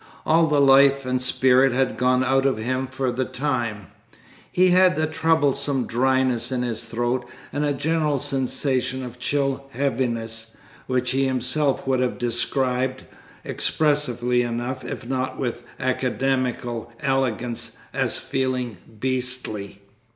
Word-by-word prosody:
All 165 +1 +4
the 150 -2 +2
life 140 0 +5
and 130 0 0
spirit 130 +1 +4
had 130 0 +1
gone 125 +1 +2
out 135 +1 +2
of 135 - 0
him 130 +4 -2
for 130 0 -2
the 125 +2 -1
time; 125 -6 -2 0.7
he 185 +1 +4
had 185 0 +5
a 155 - +2
troublesome 145 -4 +1
dryness 130 -1 +1
in 125 -1 -1
his 115 -1 -2
throat, 120 +2 -1 0.3
and 145 - -1
a 145 - +1
general 150 +1 0
sensation 130 -1 -1
of 125 0 -8
chill 135 0 -1
heaviness, 115 -4 -2 0.3
which 125 -1 0
he 135 +1 +1
himself 130 +2 0
would 130 -1 +1
have 125 -1 0
described 125 +2 0 0.4
expressively 125 -5 +1
enough, 120 +2 -3
if 130 - -6
not 130 0 -2
with 120 -2 -3 0.2
academical 130 -2 -1
elegance 125 -3 -1 0.2
as - - 0
"feeling 130 -4 -2 0.2
beastly." 125 -6 -3
130 Hz, 130 wpm, -23 LUFS, 125-135 Hz, 0.7 s, life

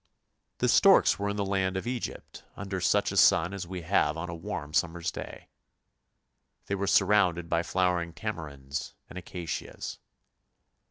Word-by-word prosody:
The - - +1
storks - - +5
were 100 0 -1
in 100 - -2
the 100 -1 -1
land 95 -1 0
of 95 - -4
Egypt 120 -1 -5
under 95 -2 -4
such 100 +3 +2
a - - -3
sun 85 +4 +5
as 95 -3 -5
we 90 -1 -6
have 80 -3 +2
on 85 +1 -4
a - - -5
warm 80 -4 -6
summer's 85 +1 0
day! - - -9 1.2
They - - -3
were 100 0 -1
surrounded 95 -4 +3
by 85 0 +1
flowering 90 -1 0
tamarinds 75 -9 -5
and 90 - -7
acacias. 85 -3 -6
90 Hz, 155 wpm, -28 LUFS, 85-100 Hz, 1.2 s, storks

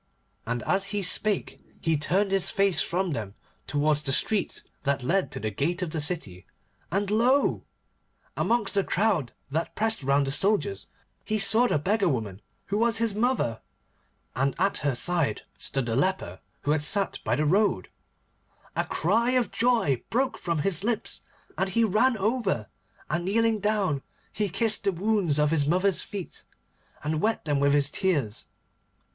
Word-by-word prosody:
And 120 0 -2
as 195 0 +1
he 200 0 -2
spake 205 +2 0 0.2
he 165 -1 +1
turned 190 +7 0
his 195 -2 +4
face 195 -7 +3
from 180 -1 0
them 105 -5 -5 0.3
towards 150 +1 +1
the 140 -2 -2
street 205 +8 0 0.2
that 140 -2 -1
led 185 +8 +1
to - - -6
the 110 0 -3
gate 170 - -1
of 170 - -4
the 160 -2 -1
city, 100 - -2 0.4
and 200 +2 0
lo! 250 +6 +2 0.7
amongst 225 -5 +1
the 200 -1 +2
crowd 185 - 0 0.2
that 160 +3 -2
pressed 220 -2 -1
round 140 +1 +2
the 135 - -2
soldiers, 210 - 0 0.4
he 215 - -1
saw 220 +4 +4
the 155 - +1
beggar 195 +5 +1
woman 110 - -3 0.2
who 205 - -1
was 230 0 +2
his 230 -1 +1
mother, 215 - 0 0.7
and 135 +1 0
at 195 +3 +1
her 140 -3 0
side 170 +2 -1 0.2
stood 135 -2 -1
the 115 -1 -1
leper, 140 - -1 0.2
who 145 - 0
had 150 -1 +2
sat 195 +6 +1
by 115 - +1
the 150 +4 0
road. 200 +7 +2 0.9
And - - -1
a - - -26
cry 235 +2 +1
of 250 -2 +1
joy 225 - +2
broke 260 +4 0
from 170 -4 -1
his 190 -2 +1
lips, 225 0 -2 0.4
and 190 - +1
he 230 +5 +2
ran 225 +4 +3
over, 200 - -1 0.4
and 170 +3 -1
kneeling 225 +3 +2
down 200 -9 0 0.3
he 210 -2 -1
kissed 215 +4 0
the 195 - +3
wounds 190 -4 0
on 150 0 +3
his 150 -3 +2
mother's 185 +3 +2
feet, 200 -4 -7 0.6
and 155 +1 -1
wet 220 -4 0
them 145 -2 +1
with 140 0 +3
his 145 0 +2
tears. 145 - -1
185 Hz, 170 wpm, -26 LUFS, 145-215 Hz, 0.9 s, his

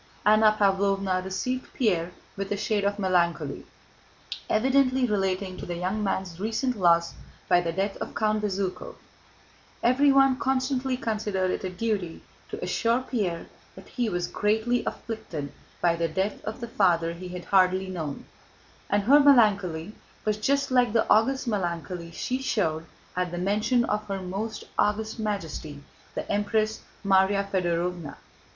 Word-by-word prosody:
Anna 215 0 +5
Pávlovna 195 -2 +2
received 250 +7 -3
Pierre 180 -8 +1 0.2
with 195 0 -5
a 205 - 0
shade 210 0 0
of 200 0 0
melancholy, 180 -3 0 0.8
evidently 260 +2 +3
relating 195 -3 -1
to - - -7
the 175 - -3
young 185 +5 -2
man's 190 -3 -2
recent 230 +5 -1
loss 170 -4 +3 0.3
by 175 -1 +4
the 170 -1 -2
death 195 +4 -2
of - - -6
Count 215 0 +1
Bezúkhov 200 - -3 0.9
(everyone 270 +1 +4
constantly 260 -1 0
considered 210 -5 -1
it - - -3
a 185 - -2
duty 190 -3 -3 0.3
to - - -6
assure 235 +2 +1
Pierre 200 -10 -2 0.3
that - - -13
he 240 -3 -1
was 175 -2 -1
greatly 220 +4 0
afflicted 165 -11 -5 0.3
by 170 -1 +3
the 170 0 0
death 190 +6 -2
of 220 +3 -5
the 235 - -4
father 170 -7 +2
he 180 +2 -8
had 180 -1 -7
hardly 185 0 +3
known), 160 -6 -5 0.6
and 205 0 +2
her 280 +7 +7
melancholy 205 - +4 0.3
was 215 -1 +1
just 275 +5 0
like 245 -4 +3
the 230 - +2
august 255 +5 +3
melancholy 175 -4 -3
she 255 +10 -3
showed 165 -10 -1 0.3
at 180 0 0
the 175 - -5
mention 210 +6 +1
of 210 0 -2
her 195 -1 -3
most 195 +4 -4 0.2
august 220 +2 0
Majesty 160 -8 -4 0.3
the - - -4
Empress 215 +1 0 0.2
Márya 200 +1 +3
Fëdorovna. 175 -3 -1
200 Hz, 145 wpm, -26 LUFS, 180-225 Hz, 0.9 s, her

